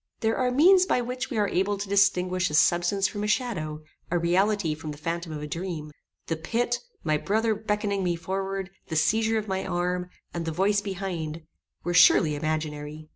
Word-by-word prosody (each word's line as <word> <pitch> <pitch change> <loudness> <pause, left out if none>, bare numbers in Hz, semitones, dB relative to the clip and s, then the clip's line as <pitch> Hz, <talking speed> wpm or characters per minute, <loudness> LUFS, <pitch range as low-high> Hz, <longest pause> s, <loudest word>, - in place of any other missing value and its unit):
There 225 0 +1
are 255 -1 +1
means 365 +8 +5
by 250 - +2
which 250 +1 -4
we 240 - -3
are 205 -1 +2
able 195 +2 0
to 200 +1 -5
distinguish 185 -2 +2
a 150 - -2
substance 175 +5 +3
from 205 -1 -5
a - - -1
shadow, 155 - -1 0.3
a 175 - +1
reality 180 0 +2
from 155 0 -7
the 150 - -6
phantom 165 +2 -4
of 150 -1 -5
a - - -4
dream. 165 -1 -5 0.3
The 165 - -2
pit, 235 +9 -1 0.2
my 155 - +2
brother 220 +7 +1
beckoning 210 -2 -1
me 175 -1 +1
forward, 190 +2 -3 0.2
the 160 - -4
seizure 220 +8 +2
of 215 -1 -3
my 190 -1 -1
arm, 180 0 -2 0.2
and 170 - -3
the 165 - -2
voice 200 +5 +2
behind, 175 -5 -4 0.4
were 175 - -1
surely 160 -3 +6
imaginary. 155 0 -4
185 Hz, 190 wpm, -26 LUFS, 160-210 Hz, 0.4 s, surely